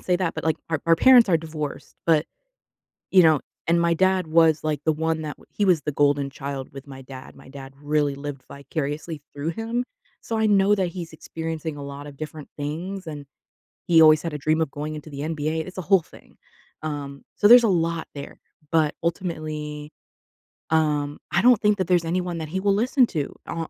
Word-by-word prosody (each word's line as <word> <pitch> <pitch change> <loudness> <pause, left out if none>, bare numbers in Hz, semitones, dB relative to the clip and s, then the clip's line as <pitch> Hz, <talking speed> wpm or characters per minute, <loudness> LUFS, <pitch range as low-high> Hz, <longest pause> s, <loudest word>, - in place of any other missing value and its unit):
say 180 - 0
that, 180 -2 -1
but, 160 - -5
like, 160 -2 +2 0.2
our 160 -3 0
our 165 - +6
parents 250 +2 +7
are 170 - +5
divorced, 155 -2 -6
but, 160 -2 +3 0.8
you 185 -1 +7
know 160 -4 +5 0.3
and 170 0 +3
my 170 0 +2
dad 185 0 +2
was, 160 -1 +4
like, 150 -2 -1
the 160 - +3
one 160 +1 -1
that 150 -1 -5
he 205 - -1
was 180 -5 +4
the 150 - -2
golden 145 -1 +2
child 135 -1 -6
with 135 +1 -10
my 135 -1 -10
dad. 130 0 -11
My - - -16
dad 135 -1 -10
really 145 -1 +1
lived 140 -1 -7
vicariously 145 +2 -5
through 145 +3 -3
him, 225 +6 -2 0.4
so 225 - -3
I 220 - +2
know 205 0 +4
that 190 -2 +1
he's 170 -2 -7
experiencing 160 -1 -5
a 145 - -7
lot 140 +1 -8
of 145 - -10
different 155 0 -8
things, 170 +6 -5
and 145 -2 -7 0.6
he 165 -2 +6
always 155 -1 +7
had 165 - -4
a 150 - -3
dream 155 +3 +1
of 155 - -1
going 150 +2 -5
into 155 +1 -9
the 140 -2 -8
NBA 155 0 -2
it's 185 - -10
a 185 - -2
whole 190 +2 +4
thing. - - -19 0.4
Um, 145 -2 -5
so 205 - +4
there's 245 0 +9
a 225 - +4
lot 165 -3 0
there, 140 - -8 0.3
but, 155 -2 +2
ultimately, 155 -4 -4 0.8
um, 150 -2 +1
I - - +2
don't 245 -2 +6
think 210 -1 +3
that 185 - 0
there's 175 -2 +2
anyone 175 0 -2
that 160 - -5
he 190 - -2
will 200 0 +3
listen 250 +4 +3
to, 150 -8 -4
uh, 165 -1 -3
160 Hz, 210 wpm, -24 LUFS, 145-175 Hz, 0.8 s, there's